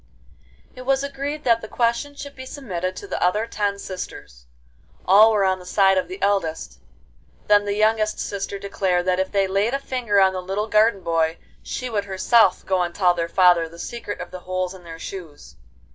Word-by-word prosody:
XIII - - -29
It 255 - -9
was 270 0 +2
agreed 280 +2 -4
that 230 -2 +3
the 220 - -7
question 235 +6 -1
should 285 0 -9
be 260 0 -9
submitted 185 -11 -4
to 405 - -8
the - - -4
other 210 +5 +2
ten 205 -3 -2
sisters. 125 - -8 0.6
All 210 +4 +7
were 205 -3 +2
on 190 0 +1
the - - -12
side 195 0 +4
of 185 - 0
the 375 +2 -8
eldest. 160 - -1 0.7
Then 205 0 +4
the 200 0 -1
youngest 215 0 +2
sister 200 0 -4
declared 190 -3 -1
that 185 0 +1
if 190 - -1
they 195 -1 +2
laid 200 +6 0
a - - -1
finger 245 -7 0
on 190 -1 +4
the 185 - -3
little 195 +4 -3
garden 215 -2 +3
boy, 165 -1 0 0.2
she 255 - -5
would 210 -4 -2
herself 195 0 +3
go 185 -1 +1
and 175 -1 -2
tell 180 -3 +3
their 170 -1 -3
father 175 -3 +4
the 170 - -14
secret 235 +2 -6
of 180 - -7
the 185 - -7
holes 185 0 -3
in 185 -2 -13
their 165 -1 -9
shoes. 165 -4 -9
195 Hz, 205 wpm, -22 LUFS, 180-225 Hz, 0.7 s, All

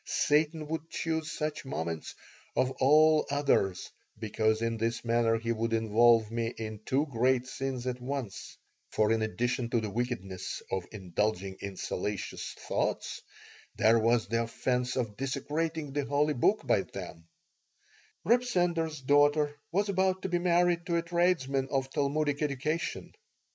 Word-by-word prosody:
Satan 155 +1 +1
would 160 0 -4
choose 160 -1 -2
such 155 -1 -3
moments 85 - -4 0.4
of 130 - +2
all 155 +3 +5
others 140 -10 +1 0.3
because 110 +1 0
in 115 0 -1
this 115 +1 -1
manner 115 -1 +2
he 115 +1 -2
would 115 0 -1
involve 115 0 +4
me 115 0 -1
in 110 -1 -5
two 140 +3 +2
great 130 -1 +1
sins 130 -1 -4
at 125 -1 -3
once; 130 -5 -5 0.3
for 110 0 +2
in 115 0 +2
addition 120 +3 -1
to 115 - +2
the 110 -2 -4
wickedness 110 -6 -4
of 95 -2 -2
indulging 95 0 -2
in 100 -1 -6
salacious 105 +1 -4
thoughts - - -2 0.5
there 115 +1 +4
was 115 +1 +2
the 115 +2 +1
offense 125 +2 -1
of 115 -5 -2
desecrating 150 +3 -2
the 145 0 0
holy 145 +2 +2
book 120 - +2
by - - +3
them 85 0 -9 1.0
Reb 240 +3 +4
Sender's 170 - 0
daughter 145 +2 +3 0.2
was 200 +4 +1
about 190 -1 +1
to 190 - -2
be 175 0 +1
married 175 -1 +2
to 170 - 0
a 170 - 0
tradesman 170 -6 +1
of 135 -1 -1
Talmudic 145 +1 0
education. 150 +3 -2
130 Hz, 150 wpm, -30 LUFS, 115-155 Hz, 1.0 s, all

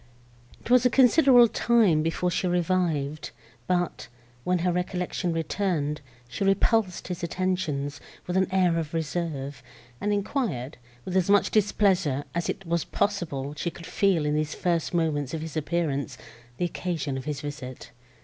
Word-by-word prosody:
It - - -8
was 250 -1 +6
a 250 - +5
considerable 250 -1 +6
time 220 -9 +3
before 165 +3 0
she 180 - 0
revived, 170 -5 0 0.4
but, 175 -2 -1 0.4
when 180 +5 +1
her 180 - +3
recollection 180 0 -2
returned, 165 -2 -1 0.3
she 125 +10 -4
repulsed 195 0 +2
his 180 - -4
attentions, 165 -6 -2 0.2
with 180 - -3
an 190 0 +2
air 180 -3 +3
of 160 0 -4
reserve, 155 -4 -3 0.4
and 210 - 0
enquired, 200 - -2 0.3
with 185 - -4
as 185 0 +2
much 205 0 +4
displeasure 190 -9 +2
as 170 0 -2
it 195 - -4
was 170 -2 0
possible 155 -9 -2
she 170 - -2
could 170 +1 -11
feel 185 -6 +1
in 150 - +1
these 155 0 -1
first 170 -3 0
moments 155 -4 0
of 160 - -4
his 160 0 -7
appearance, 155 -3 -1 0.4
the 180 - 0
occasion 165 -5 -3
of 135 -1 -5
his 145 -2 -3
visit. 145 -3 -7
170 Hz, 155 wpm, -26 LUFS, 150-190 Hz, 0.4 s, was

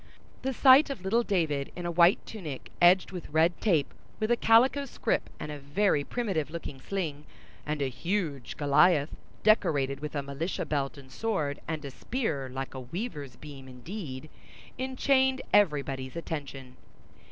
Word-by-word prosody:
The 265 - -1
sight 265 +3 +6
of 270 -9 -5
little 220 +5 +2
David 160 -10 -1
in 175 - -6
a 175 - -1
white 170 +3 +4
tunic 160 - -7
edged 180 +2 +5
with 180 -2 -7
red 160 +3 +2
tape, 165 -10 +2 0.3
with 215 +2 0
a - - +6
calico 250 +5 +4
scrip 265 - -1
and 150 - -5
a 150 - -6
very 145 +2 +1
primitive 190 - -2
looking 155 -5 -7
sling; 155 -6 -4 0.4
and 150 -1 -1
a - - +1
huge 150 - -3
Goliath 145 +1 +4 0.3
decorated 140 -10 +3
with 150 0 -6
a 140 - -1
militia 140 +6 -3
belt 140 -1 -2
and 135 -2 -13
sword, 155 -10 -2
and 155 -2 -4
a 140 - -6
spear 155 - -3
like 135 +1 -5
a 130 - -6
weaver's 145 - -6
beam 140 -2 -11
indeed, 140 - -8 0.5
enchained 265 0 +2
everybody's 140 -8 +2
attention. 140 -6 -6
155 Hz, 155 wpm, -29 LUFS, 140-205 Hz, 0.5 s, sight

